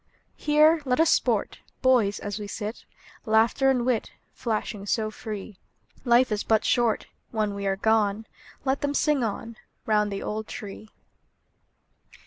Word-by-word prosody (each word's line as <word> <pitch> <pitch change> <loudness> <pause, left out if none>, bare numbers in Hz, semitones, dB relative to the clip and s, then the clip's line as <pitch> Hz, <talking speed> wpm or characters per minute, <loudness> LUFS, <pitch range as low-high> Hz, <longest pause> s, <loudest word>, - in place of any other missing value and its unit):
Here 305 +2 +4
let 255 -1 0
us 325 0 +5
sport, - - +1 0.2
Boys, 235 -6 +3
as 205 +1 -5
we 205 - -6
sit, 210 +2 -6 0.4
Laughter 225 +5 +3
and 250 -3 +1
wit 250 -4 0 0.2
Flashing 215 -3 -3
so 215 +1 0
free. 210 -3 -7 0.5
Life 240 0 +4
is 210 -1 -1
but 220 -1 +2
short, 235 -3 +2 0.2
When 215 -3 -1
we 200 0 -3
are 195 - +1
gone, 215 0 +1 0.4
Let 265 +1 0
them 285 0 -1
sing 295 -4 +2
on, 225 +1 -4 0.3
Round 210 -1 +2
the 195 - -4
old 215 +1 -4
tree. 210 +1 -8
220 Hz, 145 wpm, -26 LUFS, 210-250 Hz, 0.5 s, us